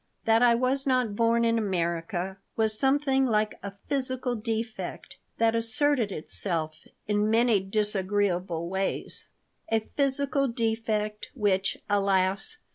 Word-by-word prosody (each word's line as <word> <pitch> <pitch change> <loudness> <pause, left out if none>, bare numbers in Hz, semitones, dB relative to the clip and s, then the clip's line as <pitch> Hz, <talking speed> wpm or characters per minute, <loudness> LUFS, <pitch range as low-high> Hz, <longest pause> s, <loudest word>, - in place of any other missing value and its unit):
That 225 +1 +4
I 240 -1 +6
was 260 +3 0
not 250 -5 +1
born 230 +1 +2
in 230 0 +2
America 175 -1 -2 0.2
was 220 -1 +2
something 270 -1 +2
like 215 -2 0
a 200 -1 -6
physical 260 -2 -1
defect 225 0 -5 0.2
that 225 0 +3
asserted 230 0 +1
itself 155 -2 -3 0.2
in 210 0 +1
many 230 -1 +4
disagreeable 190 -4 -1
ways 190 +2 -3 0.4
a 225 0 +3
physical 275 0 +1
defect 225 -3 -2
which, 195 -5 +1
alas! 200 - +1
220 Hz, 120 wpm, -27 LUFS, 195-245 Hz, 0.4 s, I